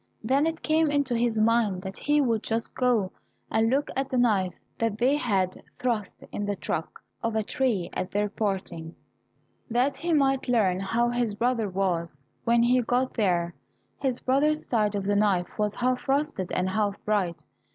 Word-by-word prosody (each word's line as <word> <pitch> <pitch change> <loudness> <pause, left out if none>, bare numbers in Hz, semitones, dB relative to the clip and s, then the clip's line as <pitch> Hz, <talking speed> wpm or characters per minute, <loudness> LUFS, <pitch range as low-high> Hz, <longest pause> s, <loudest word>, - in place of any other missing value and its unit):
Then 275 +7 +2
it 325 0 -4
came 315 0 +3
into 285 -3 +1
his 230 -1 +1
mind 215 -4 +2
that 190 0 -6
he 295 +1 +2
would 230 -5 +1
just 225 0 -2
go 240 -7 +1 0.4
and 220 +1 +3
look 275 +4 0
at 270 0 -1
the 255 - -1
knife 200 -7 +2 0.2
that 225 -2 0
they 255 +5 +3
had 195 -9 0 0.2
thrust 230 -5 -2
in 205 - -3
the 205 0 -1
trunk - - -2 0.3
of 230 -1 -1
a 220 - +1
tree 235 -8 0
at 185 - -3
their 210 +2 0
parting, 190 -6 -3 0.7
that 255 +4 +1
he 340 0 -2
might 275 -3 +2
learn 205 -7 +2
how 235 +5 +1
his 240 -3 -1
brother 230 -2 0
was. 175 -5 -1 0.3
When 235 0 +4
he 250 +1 +4
got 250 +2 0
there 175 -6 +1 0.5
his 260 -3 -1
brother's 300 +4 +2
side 210 -3 +1
of 200 -1 -2
the 205 +1 +1
knife 200 -2 +1
was 210 -1 0
half 255 +1 -1
rusted, 275 - 0
and 185 +1 0
half 205 0 0
bright. 180 -7 0
225 Hz, 180 wpm, -27 LUFS, 195-255 Hz, 0.7 s, When